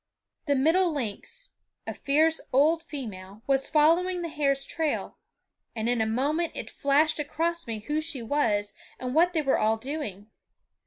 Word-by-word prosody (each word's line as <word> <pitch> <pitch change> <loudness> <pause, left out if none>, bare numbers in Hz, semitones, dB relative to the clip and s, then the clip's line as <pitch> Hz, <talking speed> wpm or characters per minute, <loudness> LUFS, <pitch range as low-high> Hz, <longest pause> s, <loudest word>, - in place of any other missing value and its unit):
The 285 - +3
middle 330 +6 +3
lynx, 300 - -5 0.3
a - - -4
fierce 315 +3 +2
old 310 +5 +4
female, 215 - -8
was 270 -1 +1
following 345 +4 +3
the 335 - -3
hare's 275 -3 0
trail; 320 -3 -2 0.6
and 220 0 -2
in 240 -1 +1
a 220 - +1
moment 290 +9 0
it - - -6
flashed 305 +3 +2
across 330 +2 -2
me 220 -2 -4
who 300 +8 -1
she 310 -6 -4
was 220 -6 0 0.2
and 255 0 -4
what 345 +4 +4
they 315 -3 +1
were 270 - +2
all 220 +1 +2
doing. 220 -6 -6
290 Hz, 160 wpm, -27 LUFS, 235-320 Hz, 0.6 s, old